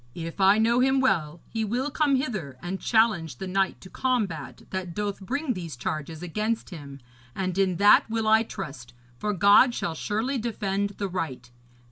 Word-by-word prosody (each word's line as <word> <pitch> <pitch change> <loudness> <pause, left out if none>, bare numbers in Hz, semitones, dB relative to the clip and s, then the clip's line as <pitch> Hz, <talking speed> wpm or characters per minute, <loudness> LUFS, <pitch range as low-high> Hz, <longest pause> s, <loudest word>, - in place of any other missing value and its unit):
If 165 +3 -5
I 195 +2 +6
know 230 +2 +3
him 265 +1 +3
well, 170 - +1
he 225 -1 -3
will 245 +7 -1
come 285 0 +2
hither 210 - -3
and 185 +2 -4
challenge 210 - +2
the - - -5
knight 190 +1 0
to 185 - -12
combat 210 - -2
that 185 -3 -4
doth 205 -1 -2
bring 275 +7 -2
these 170 - -6
charges 155 +5 -4
against 215 +6 -2
him, 140 -5 -9 0.4
and 185 -2 -2
in 190 -2 +2
that 205 +4 +5
will 225 -1 -1
I 220 +1 +6
trust, 135 - -7 0.2
for 210 - -1
God 205 +6 +5
shall 165 - -2
surely 225 - -2
defend 200 -3 -2
the 200 - -2
right. 140 -10 -5
195 Hz, 175 wpm, -26 LUFS, 170-225 Hz, 0.4 s, I